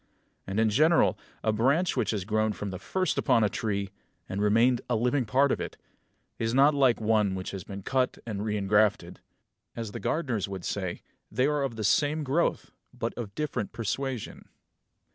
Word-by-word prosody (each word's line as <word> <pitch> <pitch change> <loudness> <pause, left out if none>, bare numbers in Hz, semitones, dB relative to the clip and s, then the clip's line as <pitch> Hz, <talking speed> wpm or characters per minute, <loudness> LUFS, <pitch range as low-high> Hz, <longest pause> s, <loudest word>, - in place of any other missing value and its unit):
And 95 +3 -1
in 110 -1 +3
general 155 +9 +4 0.3
a 110 - +2
branch 140 - +2
which 115 -6 0
has 105 -4 -1
grown 110 0 +1
from 100 -1 -5
the 90 - -6
first 185 - -1
upon 125 -5 +3
a 105 - +3
tree, 100 -3 -2 0.4
and 95 +2 -3
remained 115 +4 +3
a 120 - +2
living 125 +3 +1
part 135 +5 +3
of - - -1
it, - - -6 0.6
is 115 +1 0
not 140 +3 +6
like 135 -4 +3
one 105 -3 +2
which 95 0 -5
has 95 -3 -6
been 100 +1 -8
cut 130 +2 0
and 110 -4 -4
reingrafted; 105 -2 +1 0.6
as 115 -3 -5
the - - -6
gardeners 125 - -1
would 95 -2 -6
say, 95 -3 -3 0.3
they 125 +5 +2
are 150 0 +1
of 135 -4 -2
the 110 - -4
same 150 +8 +2
growth 145 +5 0 0.2
but - - -4
of 105 -4 -7
different 150 -9 -3
persuasion. 125 +2 -4
110 Hz, 180 wpm, -28 LUFS, 105-135 Hz, 0.6 s, not